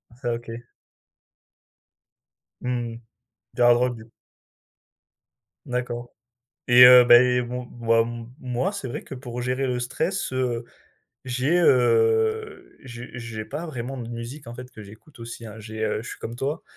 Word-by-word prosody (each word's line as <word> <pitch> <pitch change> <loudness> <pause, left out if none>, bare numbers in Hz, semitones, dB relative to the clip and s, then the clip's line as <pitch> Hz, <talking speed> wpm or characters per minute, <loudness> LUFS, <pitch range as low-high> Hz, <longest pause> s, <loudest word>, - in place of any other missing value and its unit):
Ça 120 -2 -3
OK. 115 0 -7 2.1
Mmh 120 -2 -2
mh. 115 - -10 0.5
Du 125 - -4
hard 120 0 +6
rock, 125 0 0
du 110 +1 -14 1.5
D'accord 120 -1 -4 0.6
et 125 +1 +9
heu, 125 0 +10
beh, 125 +1 +6
bon, 125 +1 -5
bah, 115 -1 +1
m 115 0 -7
moi, 125 +10 -2
c'est 140 -11 -5
vrai - - -6
que - - -8
pour 125 -1 -7
gérer 130 +2 -1
le 125 -1 -1
stress, 160 +7 -2
heu, 125 -2 -1 0.6
j'ai, 130 +8 +1
heu, 440 - +2
j'ai 125 -1 -9
j'ai 110 -2 -6
pas 160 +4 -6
vraiment 130 -2 -5
de 120 -1 -6
musique, 120 +4 -7
en 120 - -8
fait, 125 +1 -10
que 110 - -11
j'écoute 110 +7 -15
aussi, 115 0 -8
hein. 110 0 -10
J'ai, 110 0 -6
heu, 110 0 -1
je - - -8
suis - - -8
comme 115 +1 -7
toi, 140 +5 -3
125 Hz, 160 wpm, -24 LUFS, 115-130 Hz, 2.1 s, heu